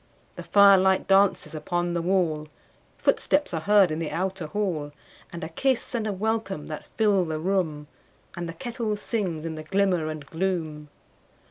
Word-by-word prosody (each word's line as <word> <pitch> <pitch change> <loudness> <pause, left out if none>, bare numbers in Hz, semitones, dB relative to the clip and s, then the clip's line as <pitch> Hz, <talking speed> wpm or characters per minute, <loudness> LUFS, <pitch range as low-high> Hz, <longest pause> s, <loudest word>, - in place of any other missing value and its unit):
The - - -7
firelight 195 -2 +5
dances 195 -2 +3
upon 175 +3 -2
the 170 - 0
wall, 165 -4 0 0.5
Footsteps 290 -9 +1
are 165 - 0
heard 200 -1 +4
in 155 - -2
the 165 -2 -3
outer 185 0 -3
hall, 160 -5 -2 0.4
And 170 - -7
a 160 - -4
kiss 260 - 0
and 225 -3 -1
a - - 0
welcome 205 -5 -2
that 155 -1 -7
fill 205 -4 +3
the 160 -2 -3
room, 165 -4 -1 0.5
And 170 -1 -5
the - - -5
kettle 230 -2 -3
sings 185 -8 -3
in 165 - -3
the 155 - -6
glimmer 185 -1 +1
and 155 -2 -6
gloom. 160 -3 -3
180 Hz, 165 wpm, -26 LUFS, 160-200 Hz, 0.5 s, firelight